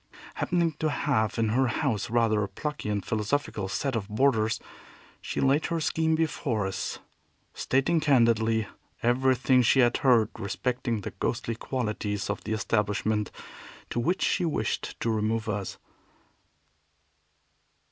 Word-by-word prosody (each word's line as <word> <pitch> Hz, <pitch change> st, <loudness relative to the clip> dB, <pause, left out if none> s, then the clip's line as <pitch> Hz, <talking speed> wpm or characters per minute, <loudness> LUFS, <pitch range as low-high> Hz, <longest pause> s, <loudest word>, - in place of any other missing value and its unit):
Happening 170 Hz, -2 st, +1 dB
to 155 Hz, -, +1 dB
have 120 Hz, -8 st, 0 dB
in 115 Hz, -1 st, +1 dB
her 130 Hz, +4 st, +2 dB
house 115 Hz, -2 st, -1 dB
rather 115 Hz, -2 st, +2 dB
a 100 Hz, -, -1 dB
plucky 125 Hz, +4 st, -4 dB
and 100 Hz, -2 st, -1 dB
philosophical 110 Hz, -1 st, -1 dB
set 135 Hz, +6 st, -2 dB
of 105 Hz, -4 st, -2 dB
boarders, 110 Hz, -1 st, +2 dB, 0.6 s
she -, -, -4 dB
laid 135 Hz, +3 st, +3 dB
her 170 Hz, -, -1 dB
scheme 160 Hz, 0 st, +1 dB
before 140 Hz, -9 st, -1 dB
us, 95 Hz, -, -3 dB, 0.6 s
stating 135 Hz, +6 st, +1 dB
candidly 115 Hz, -6 st, +3 dB, 0.4 s
everything 130 Hz, +1 st, +3 dB
she 125 Hz, +3 st, +4 dB
had 120 Hz, -1 st, +3 dB
heard 120 Hz, -5 st, +4 dB
respecting 120 Hz, +2 st, -2 dB
the -, -, -5 dB
ghostly 115 Hz, -, -2 dB
qualities 105 Hz, -4 st, -2 dB
of -, -, -5 dB
the 110 Hz, -, -1 dB
establishment 105 Hz, 0 st, 0 dB, 0.6 s
to -, -, -1 dB
which 175 Hz, +10 st, 0 dB
she 185 Hz, -, +1 dB
wished 165 Hz, -3 st, -2 dB
to 115 Hz, -, +1 dB
remove 110 Hz, +1 st, 0 dB
us. 105 Hz, -2 st, -3 dB
115 Hz, 135 wpm, -27 LUFS, 110-135 Hz, 0.6 s, she